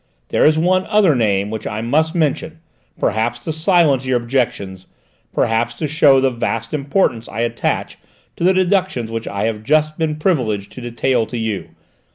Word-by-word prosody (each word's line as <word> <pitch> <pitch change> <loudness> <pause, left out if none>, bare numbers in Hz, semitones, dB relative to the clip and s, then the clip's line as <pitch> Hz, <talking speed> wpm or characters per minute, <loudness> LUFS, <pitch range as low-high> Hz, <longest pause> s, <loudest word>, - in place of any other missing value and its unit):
There - - +3
is 155 0 +3
one 185 +3 +2
other 205 -6 +4
name 105 -4 0
which 110 -1 -5
I 110 0 -4
must 155 +8 +1
mention, 160 0 -1 0.4
perhaps 115 +2 0
to 155 - -4
silence 160 -5 +3
your 130 -1 +1
objections, 115 -7 -2 0.4
perhaps 115 +1 0
to 155 - -3
show 145 -2 +4
the 135 0 +2
vast 115 0 -3
importance 140 -5 0
I 110 +4 -4
attach 120 0 -2 0.4
to - - -4
the 185 - +5
deductions 185 - 0
which 115 0 -4
I 100 0 -3
have 110 -1 -2
just 155 +4 +1
been 160 -2 0
privileged 125 - -1
to 125 - -10
detail 120 0 0
to 120 - -5
you. 110 -3 -3
130 Hz, 175 wpm, -18 LUFS, 115-155 Hz, 0.4 s, the